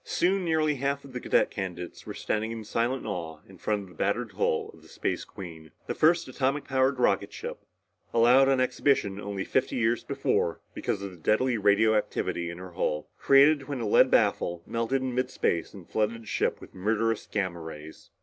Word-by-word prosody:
Soon 190 +2 +1
nearly 155 -3 +1
half 140 +1 -1
of 135 - -12
the 125 - -3
cadet - - +2
candidates 90 -3 -6
were - - -5
standing 110 +1 -2
in 115 -1 -5
silent 120 +5 -1
awe 85 -7 -4
in 95 -2 -15
front 105 -1 -1
of - - -12
the - - -15
battered 100 +6 -1
hull 95 -4 0
of - - -17
the - - -17
Space - - -2
Queen, 80 -4 -10 0.2
the - - -2
first 165 +2 +3
atomic 135 +2 -1
powered 130 0 +1
rocket 125 - +2
ship - - -6 0.5
allowed 125 +4 +5
on 135 -1 +3
exhibition 125 -6 +1
only 100 -1 -4
fifty 130 - 0
years 120 -1 +1
before 85 - 0
because 100 - -3
of 100 - -5
the 90 - -13
deadly 110 +9 +2
radioactivity 105 -4 +2
in 85 - -7
her 90 0 -9
hull, 75 -3 -2
created 140 +1 +5
when 140 -3 -3
a 115 - -2
lead - - +5
baffle 85 -1 +2
melted 115 +3 -1
in 130 -2 -2
midspace 125 -9 0
and 95 -4 -12
flooded 110 +1 -1
the - - -16
ship - - 0
with - - -13
murderous 110 +3 0
gamma 95 -4 -1
rays. 80 -1 -10
110 Hz, 195 wpm, -28 LUFS, 95-130 Hz, 0.5 s, allowed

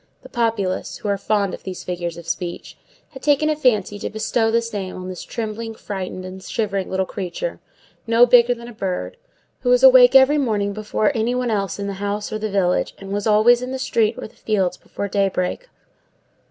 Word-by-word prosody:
The - - -12
populace, 225 -6 -1
who 210 - -4
are 200 - +1
fond 200 -2 0
of - - -7
these 185 -1 -7
figures 175 -2 -4
of 170 -1 -11
speech, 175 -1 -4 0.3
had 265 -3 -12
taken 300 +2 +3
a - - 0
fancy 215 -8 +1
to - - -4
bestow 225 +1 0
this 230 0 0
name 190 -3 -4
on 185 0 -7
this 180 -2 -6
trembling, 225 -1 -5
frightened, 185 -3 -6
and 185 +1 -8
shivering 200 -3 -2
little 190 0 0
creature, 190 - -5 0.5
no 230 +1 +6
bigger 245 0 +5
than 235 0 -11
a 240 - -10
bird, 195 - -3 0.4
who 250 - -1
was 250 +1 +4
awake 255 -1 +8
every 270 +3 +6
morning 205 -6 0
before 215 +4 0
any 235 +1 0
one 250 -2 -1
else 195 -4 -1
in 200 - -4
the 200 - -3
house 205 +1 -3
or 215 - -2
the 215 0 -2
village, 190 -3 0
and 195 0 -9
was 205 +1 -1
always 220 +3 +5
in 250 - -4
the 265 - -3
street 225 -3 +1
or - - -6
the 220 - -23
fields 190 -5 0
before 200 - -6
daybreak. 195 - -1
215 Hz, 205 wpm, -21 LUFS, 195-240 Hz, 0.5 s, awake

